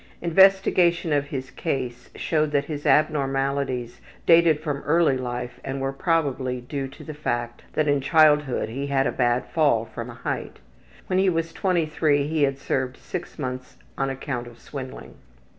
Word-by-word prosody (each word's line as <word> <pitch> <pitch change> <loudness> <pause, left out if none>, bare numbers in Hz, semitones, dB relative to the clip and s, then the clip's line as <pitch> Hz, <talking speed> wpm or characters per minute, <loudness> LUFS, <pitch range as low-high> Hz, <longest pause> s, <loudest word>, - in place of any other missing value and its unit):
Investigation 175 -2 +4
of 145 0 +1
his 130 -2 -5
case 125 -6 -4
showed 155 -2 0
that 140 0 +2
his 145 -1 -4
abnormalities 135 -4 +1 0.2
dated 165 -2 +5
from 145 -3 -3
early 160 -2 +3
life 125 -1 -4
and 135 0 -4
were 135 0 -2
probably 135 -5 0
due 135 +2 -4
to 135 - -13
the 155 - -7
fact 120 -5 -3
that 155 - +1
in 145 -1 +2
childhood 150 -2 +4
he 135 +5 -4
had 135 -1 +1
a - - +1
bad 120 0 +1
fall 140 -9 +2
from 115 +1 -7
a 120 - -9
height. - - -4 0.5
When 185 0 +1
he 190 0 +4
was 165 -1 -1
23 155 -6 +1
he 155 0 -1
had 135 -1 +2
served 130 -1 -2
six 175 -2 -7
months 130 -3 -5 0.2
on 135 0 -1
account 130 -2 -4
of 120 -1 -13
swindling. 130 -1 -9
140 Hz, 165 wpm, -24 LUFS, 130-155 Hz, 0.5 s, dated